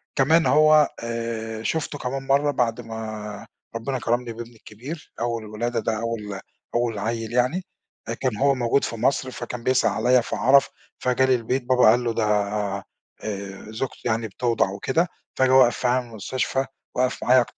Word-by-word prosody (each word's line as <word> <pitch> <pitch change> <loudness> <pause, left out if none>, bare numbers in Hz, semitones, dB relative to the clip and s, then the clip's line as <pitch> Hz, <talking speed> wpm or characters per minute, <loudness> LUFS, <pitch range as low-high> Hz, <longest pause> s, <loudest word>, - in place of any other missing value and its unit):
كمان 160 +5 +4
هو 155 0 +6 0.2
آآ 115 -1 -4
شُفته 150 0 -2
كمان 135 +1 -4
مرَّة 140 +2 +3
بَعد 120 -3 0
ما 110 -2 -7 0.3
ربنا 125 +3 -2
كرَمني 120 0 -1
بابني 120 +1 -9
الكبير، 130 +10 -9
أول 115 -1 -1
الولادة، 115 +3 -2
ده 110 -1 -1
أول 105 -4 -4 0.4
أول 120 -3 0
عيّل 115 +1 -3
يعني، 130 +10 +1 0.5
آآ 115 - 0
كان 120 -2 -2
هو 140 +4 +3
موجود 120 +2 +1
في - - -2
مصر 130 +2 0
فكان 120 -1 -6
بيسأل 130 0 +3
عليَّ، 125 0 +3
فعرِف 130 +4 +3 0.3
فجالي 130 +1 +3
البيت 125 +2 -1
بابا 125 0 +5
قال 120 +1 +2
له، 115 -1 0
ده 115 - 0
آآ 100 -1 0 0.9
زوجتي 120 +4 -4
يعني 115 0 0
بتوضَع 115 -1 0
وكده، 130 - 0 0.3
فجه 130 0 +3
وقَف 130 -2 +6
في 125 - 0
المستشفى، 125 +2 -1 0.3
وقَف 130 0 0
معايا 125 0 +5
120 Hz, 155 wpm, -24 LUFS, 115-130 Hz, 0.9 s, هو